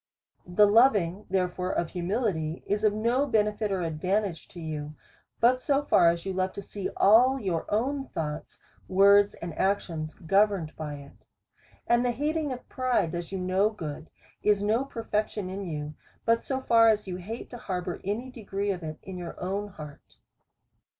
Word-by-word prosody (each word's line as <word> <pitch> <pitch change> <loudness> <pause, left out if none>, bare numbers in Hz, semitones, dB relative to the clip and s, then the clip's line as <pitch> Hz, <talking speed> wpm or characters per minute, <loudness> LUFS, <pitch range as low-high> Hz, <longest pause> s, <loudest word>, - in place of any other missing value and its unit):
The 180 +4 +5
loving 205 -4 +3
therefore 180 -1 -1
of 170 - -1
humility 175 -4 -2
is 205 +1 -1
of 215 - +5
no 235 +7 +1
benefit 210 -2 +1
or 190 -2 -1
advantage 180 +3 -1
to 175 - -12
you, 155 -2 -5 0.4
but 250 +2 +4
so 280 +2 +1
far 170 -11 +5
as 170 +1 -2
you 190 - -2
love 185 0 -1
to - - -6
see 200 -1 -5
all 250 +6 +5
your 180 -7 -2
own 270 +6 0
thoughts, 150 -2 -5 0.3
words, 200 +2 +5
and 170 -1 -7
actions, 165 -5 -1
governed 195 -2 +1
by 150 -2 -5
it. 140 0 -11 0.7
And 240 +1 +3
the 245 -1 +1
hating 300 +3 -1
of 250 -1 -7
pride 255 -10 0
does 170 0 -5
you 195 - -3
no 185 +3 +2
good, 160 -7 -7 0.3
is 205 -1 +2
no 225 +6 +1
per 230 -4 -7
fection 210 -3 -2
in 195 +1 -5
you, 150 -2 -4 0.3
but 230 0 +3
so 265 -1 -3
far 230 -3 +5
as 210 -1 +2
you 180 -2 -5
hate 215 +6 -7
to 245 - -7
harbour 180 -3 -4
any 230 +7 -3
degree 205 -4 -3
of 180 -2 -4
it 155 -1 -6
in 190 -1 -7
your 175 -1 -7
own 195 +3 -2
heart. 150 -7 -12
195 Hz, 175 wpm, -28 LUFS, 175-225 Hz, 0.7 s, The